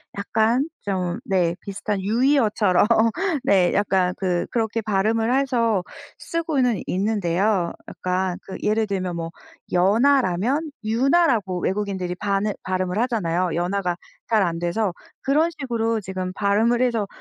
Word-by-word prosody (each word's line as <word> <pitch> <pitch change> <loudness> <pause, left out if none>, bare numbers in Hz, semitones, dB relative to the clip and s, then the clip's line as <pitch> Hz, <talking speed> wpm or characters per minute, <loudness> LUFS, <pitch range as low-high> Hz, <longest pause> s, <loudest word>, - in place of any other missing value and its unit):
약간 225 +8 +1
좀 185 -3 -2
네, 175 -3 +1
비슷한 200 0 -3
유의어처럼 215 -3 +2 0.6
네, 185 -3 +3
약간 190 -3 +2
그 180 -2 0
그렇게 225 -1 -1
발음을 220 +3 +1
해서 235 -8 +1 0.4
쓰고는 280 - 0
있는데요. 195 -1 0 0.2
약간 185 0 -2
그 190 - -7
예를 215 +1 +1
들면 185 -3 -3
뭐 165 0 -4 0.4
연아라면 240 - +2
윤아라고 230 - +2
외국인들이 190 -2 -2
반을 200 +2 -1
발음을 185 +1 -1
하잖아요. 185 -8 0
연아가 180 0 -1 0.3
잘 215 -3 +3
안 170 -1 -1
돼서. 175 +2 -1 0.3
그런 305 +5 +2
식으로 230 -4 -1
지금 185 -1 -4
발음을 215 +5 +2
해서 230 -5 0
205 Hz, 280 characters per minute, -23 LUFS, 185-230 Hz, 0.6 s, 네